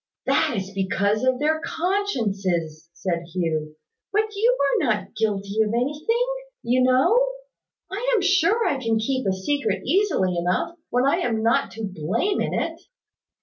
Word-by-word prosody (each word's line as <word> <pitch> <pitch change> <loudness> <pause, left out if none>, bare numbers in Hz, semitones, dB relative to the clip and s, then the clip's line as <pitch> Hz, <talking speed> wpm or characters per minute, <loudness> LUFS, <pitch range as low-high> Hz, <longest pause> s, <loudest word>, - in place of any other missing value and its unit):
"That 235 - +2
is 195 0 -4
because 200 +3 0
of 260 -1 +2
their 310 +3 +1
consciences," 200 - -1
said 170 -1 -2
Hugh. 155 -3 -1 0.4
"But 430 +1 0
you 470 +5 +3
are 280 +1 +2
not 205 -3 -1
guilty 210 -1 0
of 215 -1 +1
anything, 300 - 0 0.4
you 250 +2 +2
know. 260 - +4 0.7
I 465 +6 -1
am 430 - +2
sure 390 +4 +3
I 280 - +1
can 225 -2 +1
keep 260 +2 -1
a - - +3
secret 210 +3 -1
easily 280 - +1
enough, 180 - -1
when 250 +1 +2
I 275 - +3
am 225 -2 -1
not 230 +1 +2
to 225 - -7
blame 200 - -1
in - - -1
it." - - -2
235 Hz, 155 wpm, -24 LUFS, -, 0.7 s, know